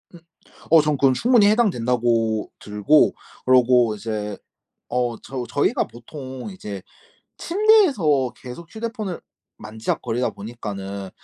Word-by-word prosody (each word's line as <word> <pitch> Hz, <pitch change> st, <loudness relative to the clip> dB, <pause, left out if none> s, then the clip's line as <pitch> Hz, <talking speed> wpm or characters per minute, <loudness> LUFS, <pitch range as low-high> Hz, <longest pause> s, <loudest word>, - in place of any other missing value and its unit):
음. -, -, -13 dB, 0.5 s
어 165 Hz, -1 st, +8 dB
전 150 Hz, -1 st, 0 dB
그건 135 Hz, -1 st, +4 dB
충분히 230 Hz, -, +4 dB
해당된다고 120 Hz, -, +1 dB
들고 105 Hz, +9 st, +3 dB, 0.3 s
그러고 125 Hz, -3 st, +4 dB
이제 105 Hz, -1 st, -4 dB, 0.5 s
어 120 Hz, -1 st, -1 dB
저 130 Hz, -1 st, -5 dB
저희가 140 Hz, +2 st, +1 dB
보통 130 Hz, -, -9 dB
이제 105 Hz, -, -7 dB, 0.6 s
침대에서 290 Hz, -, +3 dB
계속 135 Hz, +7 st, -10 dB
휴대폰을 220 Hz, -5 st, -5 dB, 0.4 s
만지작거리다 115 Hz, +2 st, -3 dB
보니까는 100 Hz, -3 st, -7 dB
125 Hz, 260 characters per minute, -22 LUFS, 110-165 Hz, 0.6 s, 어